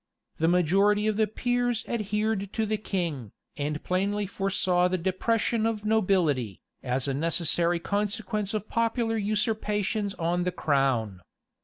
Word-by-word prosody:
The 160 - +3
majority 195 +5 +3
of 215 -1 +1
the 220 0 +2
peers 245 +1 -1
adhered 210 -2 -1
to 220 - 0
the 215 0 -1
king, 165 - -3 0.2
and 150 +1 -3
plainly 200 +3 0
foresaw 190 -3 +1
the 185 +1 0
depression 220 +5 0
of 215 -2 -3
nobility, 180 - +1 0.2
as 125 +1 -1
a 135 - 0
necessary 170 +3 +1
consequence 205 +1 -2
of 215 0 -3
popular 230 0 0
usurpations 210 -1 -1
on 175 +1 0
the 180 - 0
crown. 135 - 0
200 Hz, 135 wpm, -27 LUFS, 170-215 Hz, 0.2 s, The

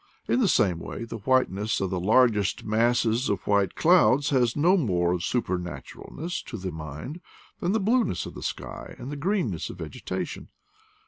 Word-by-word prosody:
In - - +2
the 235 - +3
same 90 - +2
way 115 - -6
the 115 0 -6
whiteness 110 -3 +1
of 95 -1 -2
the 95 - -1
largest 105 0 +3
masses 115 +2 +2
of 100 -3 -1
white 100 -2 +2
clouds 150 -5 +4
has 125 -4 +2
no 170 +6 +4
more 90 - +1
of 90 -1 -2
supernaturalness 90 - -4
to 115 - -6
the 95 -2 -4
mind 80 - -7 0.4
than 180 +3 0
the 220 - +2
blneness 220 - +1
of - - -8
the - - -9
sky - - -6
and 130 - -7
the - - -4
green 190 +7 0
ness - - -4
of - - -8
vegetation. - - -5
115 Hz, 180 wpm, -26 LUFS, 95-145 Hz, 0.4 s, clouds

